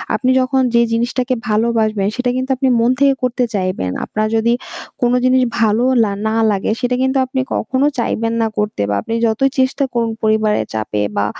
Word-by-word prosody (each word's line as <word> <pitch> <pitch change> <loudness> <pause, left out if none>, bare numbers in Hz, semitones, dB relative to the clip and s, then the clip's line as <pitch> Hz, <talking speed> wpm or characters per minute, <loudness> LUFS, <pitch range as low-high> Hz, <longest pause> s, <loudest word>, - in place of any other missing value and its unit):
আপনি 255 +4 0
যখন 260 +1 +1
যে 235 - +5
জিনিসটাকে 245 +2 0
ভালোবাসবেন 215 -2 +1
সেটা 250 0 -1
কিন্তু 260 +1 -3
আপনি 265 +1 0
মন 230 +1 +3
থেকে 280 -1 +4
করতে 250 0 0
চাইবেন। 185 - -2
আপনার 215 0 -2
যদি 230 +1 +2 0.5
কোনো 245 0 +2
জিনিস 255 0 +4 0.2
ভালোও 230 +3 +2
লা 210 - 0 0.2
না 220 - -1 0.2
লাগে, 200 +1 -1
সেটা 250 0 0
কিন্তু 265 +1 +1
আপনি 260 +1 -2
কখনো 265 +2 0
চাইবেন 230 -1 -1
না 225 - +2
করতে 210 - -2
বা - - 0
আপনি 225 - -5
যতই 230 +5 +2
চেষ্টা 260 +2 +1
করুন 230 -1 0
পরিবারের 215 -1 +1
চাপে 105 -1 -2 0.2
বা 100 - +2
230 Hz, 185 wpm, -17 LUFS, 215-255 Hz, 0.5 s, যে